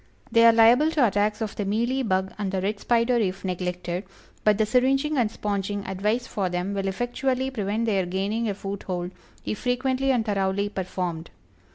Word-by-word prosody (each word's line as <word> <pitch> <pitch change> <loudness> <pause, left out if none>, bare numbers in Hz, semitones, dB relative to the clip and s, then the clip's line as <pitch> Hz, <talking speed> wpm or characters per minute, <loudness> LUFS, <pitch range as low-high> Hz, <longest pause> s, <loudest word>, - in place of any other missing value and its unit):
They 230 -1 +5
are - - +9
liable 230 +7 +5
to 285 -6 +4
attacks 210 0 +1
of 215 -2 -3
the 205 - -2
Mealy 235 +7 0
Bug 190 -5 0
and 200 -2 -2
the 190 - -1
Red 200 +2 -2
Spider 240 +2 +2
if 195 -4 -1
neglected, 180 0 -3 0.4
but 210 -1 +4
the 215 - +2
syringing 270 +6 +2
and 240 -5 +2
sponging 205 -1 -3
advised 210 +6 -1
for 195 -6 -2
them 180 +3 -2
will 195 -1 -2
effectually 255 +5 -1
prevent 215 -1 -1
their 195 -5 +1
gaining 205 +5 -1
a 200 - -2
foothold 190 -3 -4 0.3
if 215 - -3
frequently 260 +2 0
and 240 -4 +1
thoroughly 200 -1 0
performed. 180 -4 -4
210 Hz, 180 wpm, -25 LUFS, 190-240 Hz, 0.4 s, are